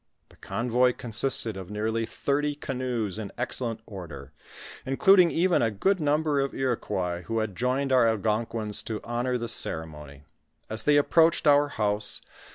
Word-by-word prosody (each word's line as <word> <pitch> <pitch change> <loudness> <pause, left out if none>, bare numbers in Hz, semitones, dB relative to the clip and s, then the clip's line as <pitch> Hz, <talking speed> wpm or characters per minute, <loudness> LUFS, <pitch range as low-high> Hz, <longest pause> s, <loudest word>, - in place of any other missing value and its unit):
The - - -20
convoy 125 +1 0
consisted 115 -1 -1
of 95 -1 -8
nearly 110 +2 -2
thirty 145 +1 -1
canoes 125 -7 -3
in 105 -2 -6
excellent 120 -2 -2
order; 95 -5 -10 0.5
including 180 +6 +5
even 175 +2 +2
a 115 - +2
good 185 - 0
number 150 -1 +1
of 135 0 -2
Iroquois 95 -9 -2
who 115 - -2
had 110 -3 -2
joined 130 +4 -1
our 125 -3 +5
Algonquins 110 0 -1
to 110 -2 -4
honor 120 +2 -2
the 120 -1 -4
ceremony. 75 -7 -1 0.5
As 110 0 -2
they 150 0 +4
approached 165 +3 +3
our 145 0 +5
house. 105 -5 +1
120 Hz, 150 wpm, -26 LUFS, 105-140 Hz, 0.5 s, including